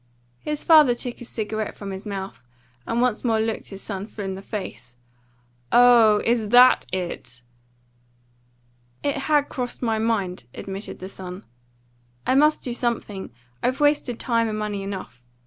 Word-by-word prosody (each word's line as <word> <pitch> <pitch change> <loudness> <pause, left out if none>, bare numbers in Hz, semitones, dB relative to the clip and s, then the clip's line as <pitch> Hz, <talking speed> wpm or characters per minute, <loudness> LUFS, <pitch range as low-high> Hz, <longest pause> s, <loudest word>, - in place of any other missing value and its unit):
His 300 -1 -3
father 305 -7 +7
took 240 0 -4
his 240 - -9
cigarette 215 -1 -3
from 200 -1 -7
his 190 +2 -7
mouth 195 -1 -5 0.5
and 235 +1 +1
once 245 -4 0
more 225 -3 +2
looked 220 0 -2
his 195 -1 -9
son 200 -1 -5
full 205 -3 -7
in 190 - -3
the 190 - -7
face. 190 - -7 0.8
"Oh, 235 -4 +6
is 230 -2 +1
THAT 250 +2 +6
it?" 130 -10 -5 1.6
"It 285 -1 0
has 290 +1 +2
crossed 250 -1 -5
my 225 -2 +1
mind," 200 - -1
admitted 195 +1 -6
the 185 - -7
son. 185 -1 -8 0.8
"I - - +2
must 300 +3 +4
do 245 - -3
something. 230 -5 -2 0.3
I've 255 +3 0
wasted 290 -5 +2
time 230 -2 +1
and 215 - -3
money 210 -2 -3
enough. 190 -11 -7
220 Hz, 155 wpm, -24 LUFS, 195-245 Hz, 1.6 s, father